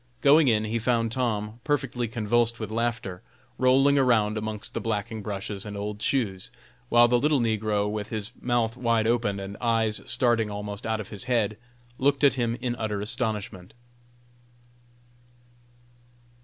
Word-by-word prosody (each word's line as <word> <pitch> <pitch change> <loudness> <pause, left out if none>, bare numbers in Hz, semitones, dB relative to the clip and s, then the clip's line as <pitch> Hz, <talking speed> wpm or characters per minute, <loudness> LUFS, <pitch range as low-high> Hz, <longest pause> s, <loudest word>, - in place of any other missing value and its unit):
Going 145 +1 +6
in, 110 -3 +3
he 110 +2 -1
found 115 -1 +1
Tom, 115 -3 -2
perfectly 135 -5 -1
convulsed 115 +1 0
with 110 -2 -5
laughter, 110 -5 -2 0.4
rolling 135 +2 +4
around 110 -5 +3
amongst 110 -1 -4
the - - -3
blacking 110 0 -3
brushes 100 -1 -5
and 105 -2 -6
old 105 +1 -5
shoes, 100 -9 -1 0.4
while 120 0 +6
the 120 0 +3
little 150 +1 +2
negro, 110 -3 0
with 105 0 -4
his 110 -2 -3
mouth 120 -2 0
wide 115 -3 +1
open 115 -4 +1
and 100 +1 -7
eyes 115 -3 +1
starting 115 -3 +2
almost 105 0 -5
out 110 0 0
of 105 - -6
his 105 +4 -4
head, 115 -4 +1 0.4
looked 140 +2 +2
at 140 - +6
him 120 -3 -1
in 120 -1 -1
utter 105 -2 -2
astonishment. 105 -3 -3
110 Hz, 150 wpm, -26 LUFS, 105-120 Hz, 0.4 s, Going